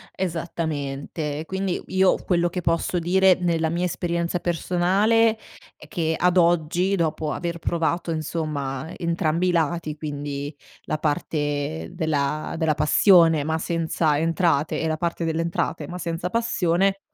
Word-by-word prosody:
Esattamente, 155 Hz, -3 st, -3 dB
quindi 190 Hz, 0 st, -2 dB
io 190 Hz, 0 st, +3 dB
quello 175 Hz, -1 st, +1 dB
che 180 Hz, -, -4 dB
posso 170 Hz, +1 st, 0 dB
dire 185 Hz, +2 st, +4 dB
nella 165 Hz, -2 st, +1 dB
mia 175 Hz, +2 st, -1 dB
esperienza 170 Hz, 0 st, -1 dB
personale 195 Hz, +7 st, +2 dB, 0.4 s
è -, -, -14 dB
che 160 Hz, -5 st, -1 dB
ad 180 Hz, 0 st, +2 dB
oggi, 175 Hz, +3 st, +2 dB
dopo 160 Hz, -3 st, -1 dB
aver 170 Hz, -1 st, -3 dB
provato 170 Hz, +1 st, -1 dB
insomma, 155 Hz, -2 st, -3 dB
entrambi 170 Hz, 0 st, 0 dB
i 180 Hz, -, +3 dB
lati, 165 Hz, -2 st, 0 dB
quindi 145 Hz, -1 st, -5 dB, 0.3 s
la -, -, -2 dB
parte 145 Hz, -, -2 dB
della 155 Hz, 0 st, -1 dB
della 160 Hz, -2 st, +1 dB
passione, 165 Hz, +1 st, +5 dB
ma 160 Hz, 0 st, 0 dB
senza 160 Hz, -2 st, 0 dB
entrate 165 Hz, -2 st, +1 dB
e 160 Hz, -, 0 dB
la 155 Hz, -, -1 dB
parte 170 Hz, +1 st, -2 dB
delle 165 Hz, 0 st, 0 dB
entrate, 170 Hz, 0 st, -2 dB
ma 180 Hz, -, -6 dB
senza 170 Hz, 0 st, -3 dB
passione 195 Hz, -4 st, +1 dB
165 Hz, 135 wpm, -24 LUFS, 155-175 Hz, 0.4 s, passione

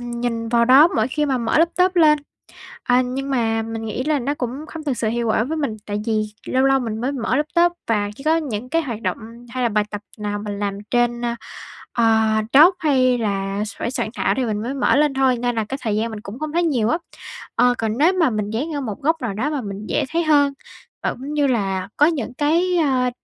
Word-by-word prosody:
nhìn 235 Hz, -1 st, -3 dB
vào 235 Hz, 0 st, +3 dB
đó 270 Hz, +6 st, +7 dB
mỗi 220 Hz, +3 st, +2 dB
khi 300 Hz, +3 st, -1 dB
mà 265 Hz, -2 st, 0 dB
mở 235 Hz, +5 st, +1 dB
laptop 360 Hz, +2 st, +2 dB
lên. 305 Hz, -3 st, +6 dB, 0.6 s
À, 250 Hz, +1 st, +3 dB
nhưng 270 Hz, +2 st, -4 dB
mà 225 Hz, -3 st, +1 dB
mình 225 Hz, 0 st, -5 dB
nghĩ 240 Hz, +4 st, -3 dB
là 305 Hz, -1 st, +1 dB
nó 280 Hz, +4 st, -2 dB
cũng 270 Hz, +4 st, -5 dB
không 315 Hz, 0 st, -8 dB
thực 270 Hz, -5 st, -2 dB
sự 220 Hz, -, 0 dB
hiệu 235 Hz, 0 st, -1 dB
quả 220 Hz, +1 st, +2 dB
với 320 Hz, +5 st, -3 dB
mình, 280 Hz, -8 st, -2 dB
tại 205 Hz, 0 st, -3 dB
vì 215 Hz, -1 st, +1 dB, 0.2 s
lâu 260 Hz, +1 st, +1 dB
lâu 270 Hz, 0 st, +4 dB
mình 225 Hz, -2 st, -4 dB
mới 260 Hz, +4 st, -1 dB
mở 250 Hz, -1 st, -1 dB
laptop 340 Hz, +4 st, +2 dB
và 205 Hz, -2 st, 0 dB
chỉ 275 Hz, -, -11 dB
có 320 Hz, +1 st, +3 dB
những 250 Hz, -6 st, -3 dB
cái 330 Hz, +3 st, +1 dB
hoạt 230 Hz, -6 st, -5 dB
động -, -, -1 dB, 0.3 s
hay 255 Hz, +1 st, -3 dB
là 240 Hz, -, +3 dB
bài 210 Hz, -1 st, +1 dB
tập 205 Hz, -, -5 dB, 0.2 s
nào 205 Hz, 0 st, -3 dB
mình 205 Hz, -1 st, -5 dB
làm 200 Hz, -1 st, -2 dB
trên, 240 Hz, 0 st, +1 dB, 0.7 s
ờ, 235 Hz, -, +1 dB, 0.5 s
Docs 330 Hz, +7 st, +8 dB
hay 255 Hz, -5 st, +3 dB
là 200 Hz, -2 st, -2 dB
s 215 Hz, -, -9 dB
phải 235 Hz, -, -2 dB
soạn 220 Hz, -, -2 dB
thảo -, -, +1 dB
thì 255 Hz, -, +1 dB
mình 210 Hz, -1 st, -2 dB
mới 250 Hz, +4 st, -3 dB
mở 280 Hz, -, +2 dB
lên 295 Hz, -1 st, +3 dB
thôi, 265 Hz, -2 st, +2 dB
nên 245 Hz, 0 st, -1 dB
là 220 Hz, -, 0 dB
cái 270 Hz, -, -4 dB
thời 215 Hz, -3 st, -1 dB
gian 225 Hz, +2 st, 0 dB
mình 215 Hz, -, -6 dB
cũng 210 Hz, +5 st, -9 dB
không 310 Hz, 0 st, -4 dB
thấy 345 Hz, -, +2 dB
nhiều 250 Hz, -9 st, +1 dB
á. 325 Hz, -, +2 dB, 0.6 s
Ờ, 245 Hz, 0 st, +4 dB
còn 225 Hz, +1 st, -2 dB
nếu 325 Hz, +6 st, +4 dB
mà 340 Hz, -7 st, +3 dB
mình 210 Hz, -2 st, -2 dB
dán 280 Hz, +9 st, -3 dB
ở 285 Hz, -, -2 dB
một 215 Hz, -6 st, -5 dB
góc 320 Hz, +1 st, +1 dB
nào 225 Hz, -5 st, -2 dB
đó 250 Hz, +9 st, -1 dB
mà 290 Hz, -4 st, -2 dB
mình 200 Hz, 0 st, -6 dB
dễ -, -, 0 dB
thấy 335 Hz, +1 st, 0 dB
hơn 285 Hz, -2 st, +3 dB, 0.5 s
và -, -, +1 dB
cũng 275 Hz, +4 st, -7 dB
như 290 Hz, -2 st, +2 dB
là 195 Hz, -6 st, -1 dB
có 295 Hz, -, +6 dB
những 280 Hz, -7 st, -1 dB
cái, 340 Hz, +6 st, +1 dB
ơ, 260 Hz, -6 st, +2 dB
250 Hz, 250 wpm, -21 LUFS, 225-295 Hz, 0.7 s, Docs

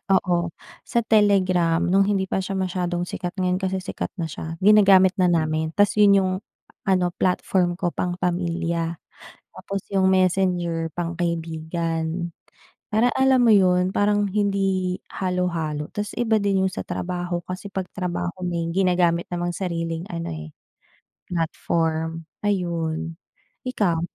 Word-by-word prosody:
oo, 175 Hz, -2 st, +1 dB, 0.4 s
sa -, -, 0 dB
Telegram 185 Hz, -6 st, +3 dB
no'ng 190 Hz, +3 st, +3 dB
hindi 195 Hz, -2 st, +1 dB
pa 190 Hz, -, -1 dB
siya 195 Hz, +1 st, -4 dB
masyadong 180 Hz, -1 st, -1 dB
sikat, 180 Hz, 0 st, -5 dB
ngayon 180 Hz, -1 st, +1 dB
kasi 190 Hz, 0 st, 0 dB
sikat 190 Hz, +1 st, -5 dB
na 170 Hz, -, -1 dB
siya, 160 Hz, +2 st, -6 dB
ginagamit 195 Hz, -2 st, +6 dB
na 185 Hz, -, +4 dB
namin 160 Hz, -1 st, 0 dB
tas 205 Hz, -1 st, +3 dB
'yun 200 Hz, -1 st, +7 dB
'yung 190 Hz, -1 st, +1 dB, 0.5 s
ano 185 Hz, -2 st, +2 dB
platform 180 Hz, -1 st, +1 dB
ko 175 Hz, -3 st, 0 dB
pang-pamilya, 170 Hz, -2 st, -1 dB, 0.5 s
tapos 195 Hz, 0 st, -5 dB
'yung 190 Hz, -1 st, +3 dB
Messenger 180 Hz, -3 st, +1 dB
pang-kaibigan. 165 Hz, 0 st, -2 dB, 0.6 s
Para 225 Hz, +4 st, +3 dB
alam 265 Hz, -1 st, +4 dB
mo 225 Hz, -, +7 dB
'yun, 185 Hz, -1 st, +3 dB
parang 205 Hz, 0 st, +2 dB
hindi 195 Hz, -2 st, 0 dB
halo-halo, 170 Hz, -5 st, -2 dB
tas 205 Hz, 0 st, -3 dB
iba 225 Hz, -2 st, +2 dB
din 195 Hz, -1 st, +2 dB
'yung -, -, 0 dB
sa -, -, -3 dB
trabaho, 175 Hz, -1 st, -3 dB
kasi 185 Hz, +2 st, -6 dB
'pag 190 Hz, -1 st, -3 dB
trabaho 175 Hz, -2 st, -2 dB
may 170 Hz, -1 st, -1 dB
ginagamit 175 Hz, -2 st, +2 dB
namang 175 Hz, 0 st, -2 dB
sariling 165 Hz, -2 st, -3 dB
ano, 170 Hz, -1 st, -4 dB
eh, 80 Hz, 0 st, -8 dB, 0.8 s
platform 165 Hz, -1 st, -1 dB, 0.2 s
ayun. 165 Hz, -4 st, -1 dB, 0.5 s
Ikaw? 190 Hz, -10 st, +1 dB
180 Hz, 130 wpm, -23 LUFS, 170-190 Hz, 0.8 s, yun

